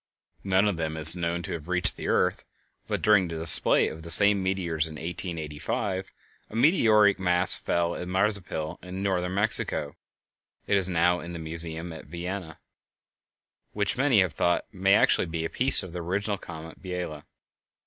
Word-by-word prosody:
None 95 +1 +1
of 100 -5 -2
them 80 -1 -4
is 80 +2 +10
known 85 0 -3
to - - -6
have 80 -1 -7
reached 90 -1 +2
the - - -7
earth, - - 0 0.4
but - - -4
during 105 -4 +3
the 80 -1 -6
display 80 0 +5
of 80 - -8
the 85 - -11
same 100 +3 +3
meteors 90 -4 -2
in 80 - -7
1885 85 +3 -5 0.4
a - - -11
meteoric 110 - +3
mass 90 -1 +2
fell 85 0 -2
at 90 - -7
Mazapil 95 -4 -2
in 90 +2 -7
Northern 90 -2 -2
Mexico 100 -8 +1 0.7
(it 100 - 0
is 95 -2 +3
now 90 0 +1
in 85 +1 -9
the - - -6
Museum 80 +1 -4
at 80 - -11
Vienna), 85 0 -7 1.2
which 100 -1 -1
many 130 -6 +2
have 90 -4 -1
thought 85 +3 -1
may 95 +1 +2
actually - - +2
be 80 0 -4
a - - -5
piece 130 +1 +3
of 90 -2 -10
the 90 - -5
original 100 +4 -3
comet 80 -1 -11
of - - -24
Biela. 90 -5 -6
90 Hz, 175 wpm, -25 LUFS, 80-95 Hz, 1.2 s, is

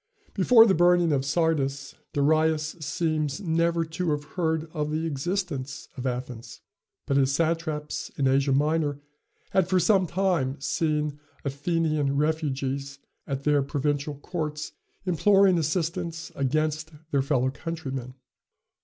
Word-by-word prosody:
Before 230 -3 +7
the 200 - +4
burning 175 -1 +4
of 135 -2 +1
Sardis, 140 -3 0 0.2
Darius 155 +1 +2
seems 155 0 -1
never 170 -2 +1
to 165 +2 -3
have 145 -1 0
heard 160 -2 0
of 150 -2 -2
the 155 +2 -1
existence 150 -2 -3
of 130 -1 -3
Athens; 125 -2 -5 0.4
but 140 - +1
his 135 -1 +3
satraps 160 -2 -1
in 140 -2 +2
Asia 135 +1 +3
Minor 145 +1 +1 0.5
had 190 -2 +3
for 185 0 +3
some 190 -1 +3
time 170 -7 0
seen 150 0 -1 0.3
Athenian 145 0 0
refugees 140 -3 -1 0.3
at 135 0 -3
their 145 -1 +3
provincial 145 +1 -1
courts 150 0 -4 0.3
imploring 190 +1 +4
assistance 165 0 -2
against 155 +3 -1 0.2
their 140 - +3
fellow 130 -2 +1
countrymen. 135 -5 -5
155 Hz, 125 wpm, -26 LUFS, 140-165 Hz, 0.5 s, Before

